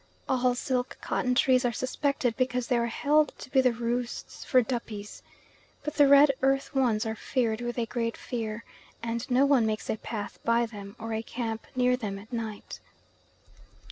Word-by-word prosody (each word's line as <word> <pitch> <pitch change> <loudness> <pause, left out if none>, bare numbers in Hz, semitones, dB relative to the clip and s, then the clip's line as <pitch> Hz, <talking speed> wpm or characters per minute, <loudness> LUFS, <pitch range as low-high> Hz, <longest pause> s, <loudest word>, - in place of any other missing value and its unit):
All 250 -1 +2
silk 250 0 -2
cotton 250 0 0
trees 255 0 +4
are 245 - +2
suspected 255 0 -1
because 250 -1 0
they 245 - +1
are 235 - +1
held 295 +5 +2
to - - -10
be 265 - +5
the 255 -1 +4
roosts 235 +1 -3
for 255 -3 +4
Duppies. 220 -4 -5 0.6
But 300 - -3
the 290 -2 +5
red 280 +1 +8
earth 270 +2 +1
ones 240 -5 +2
are 220 - -1
feared 230 0 -1
with 240 0 -3
a 235 - +1
great 230 0 -2
fear, 225 -2 -4 0.4
and 230 0 -3
no 255 +2 +4
one 270 -6 +4
makes 215 0 -2
a - - -2
path 210 -2 -6
by 235 +1 +3
them, 205 -3 -9
or 225 0 -5
a 220 - -1
camp 225 -1 -4
near 250 0 +3
them 210 -5 -4
at 220 +5 -12
night. 220 -3 -5
240 Hz, 180 wpm, -28 LUFS, 225-255 Hz, 0.6 s, red